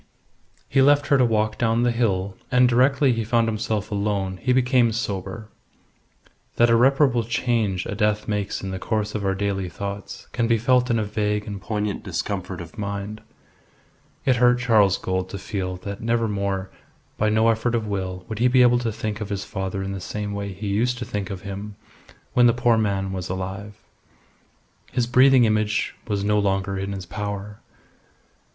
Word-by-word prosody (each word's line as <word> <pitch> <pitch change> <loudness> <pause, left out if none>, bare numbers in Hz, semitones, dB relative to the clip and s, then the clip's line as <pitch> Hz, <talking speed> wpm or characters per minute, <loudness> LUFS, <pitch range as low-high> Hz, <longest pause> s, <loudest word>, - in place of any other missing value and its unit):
He 135 - +3
left 145 +1 +5
her 140 - +5
to - - +5
walk 110 -2 0
down 115 0 +2
the 120 - +3
hill, 100 -5 0 0.2
and 125 0 +5
directly 130 +2 +3
he 115 -1 -1
found 115 +1 +2
himself 110 -1 -2
alone 100 -2 -1
he 125 - -1
became 125 -2 +3
sober. 105 -1 -4 1.1
That 120 0 +4
irreparable 125 +1 +4
change 115 -5 0
a - - -4
death 105 0 0
makes 105 -2 -2
in 95 - -4
the 95 - -4
course 110 0 -2
of 105 - -3
our 95 0 0
daily 95 -2 -2
thoughts 100 +2 -7
can 120 -2 0
be 115 0 +3
felt 125 +2 +2
in 115 - +2
a 110 - 0
vague 105 0 -1
and 100 -2 -6
poignant 105 -1 -3
discomfort 95 -3 -4
of 85 +6 -11
mind. 100 +1 -4 1.0
It 130 -2 +3
hurt 125 0 +5
Charles 110 -6 +3
Gould 95 0 -2
to 100 - -5
feel 95 -2 -4
that 100 0 -6
never 115 0 +1
more, 100 -2 -2 0.5
by 110 - +2
no 110 +1 +3
effort 115 +1 +1
of 115 -2 -1
will, 95 -3 -4
would 110 -2 -5
he 125 - +4
be 125 0 +5
able 120 0 +5
to 120 -2 -2
think 110 0 -4
of 105 - -4
his 100 -1 -3
father 95 -1 -4
in 95 - -4
the 95 -1 -5
same 105 +3 -4
way 100 0 -4
he 100 +3 -7
used 115 +5 0
to 120 - -5
think 105 0 -4
of 95 -2 -6
him 100 +1 -6 0.6
when 125 -1 +6
the 120 - +4
poor 120 -1 +3
man 100 -3 0
was 90 -1 -4
alive. 95 +3 -5 1.2
His 125 -2 +1
breathing 130 +1 +5
image 110 -1 0
was 100 -2 -1
no 105 +1 +2
longer 95 -1 0
in 95 +1 -3
his 95 -2 -5
power. 105 +1 -5
105 Hz, 185 wpm, -23 LUFS, 100-120 Hz, 1.2 s, when